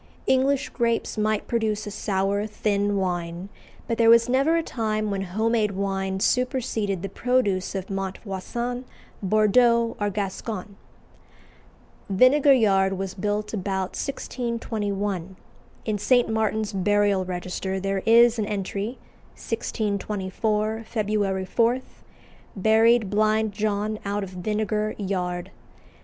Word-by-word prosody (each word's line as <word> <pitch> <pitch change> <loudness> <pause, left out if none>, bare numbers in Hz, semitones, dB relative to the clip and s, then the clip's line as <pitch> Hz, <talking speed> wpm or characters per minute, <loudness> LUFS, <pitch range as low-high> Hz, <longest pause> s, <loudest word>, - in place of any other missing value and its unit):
English 270 +2 +2
grapes 235 -2 -1
might 215 -1 0
produce 220 -2 -1
a 205 - -5
sour, 200 +1 -1
thin 205 -1 0
wine, 175 0 -3 0.4
but 230 - -2
there 230 -1 +6
was 230 0 +6
never 270 +6 +3
a 330 - 0
time 215 -5 -2
when 195 -1 -2
home 215 +5 -1
made 215 -3 +1
wine 195 0 -2
superseded 225 -6 0
the - - -1
produce 200 -4 0
of 190 -1 -3
Montvoisin, 195 +6 -4 0.4
Bordeaux, 230 +3 +3
or 205 - +1
Gascony. 200 +1 -4 1.4
Vinegar 255 +8 +5
Yard 195 -6 +3
was 190 0 -4
built 210 +2 -2
about 190 -2 -2
1621. 205 -8 -3 0.5
In 215 -2 0
St 245 +3 +3
Martin's 220 -1 -1
Burial 200 0 +2
Register 185 +1 -3
there 195 0 -1
is 235 +1 +6
an 210 - 0
entry, 205 +3 -3 0.4
"1624, 215 0 -2
Feb. 205 -4 0
4: 235 +5 +2 0.8
Buried 220 +1 +4
Blind 215 +1 +2
John 210 +1 -1
out 205 0 -2
of 190 - -7
Vinagre 215 +3 -1
Yard." 180 -3 -3
210 Hz, 120 wpm, -25 LUFS, 195-230 Hz, 1.4 s, there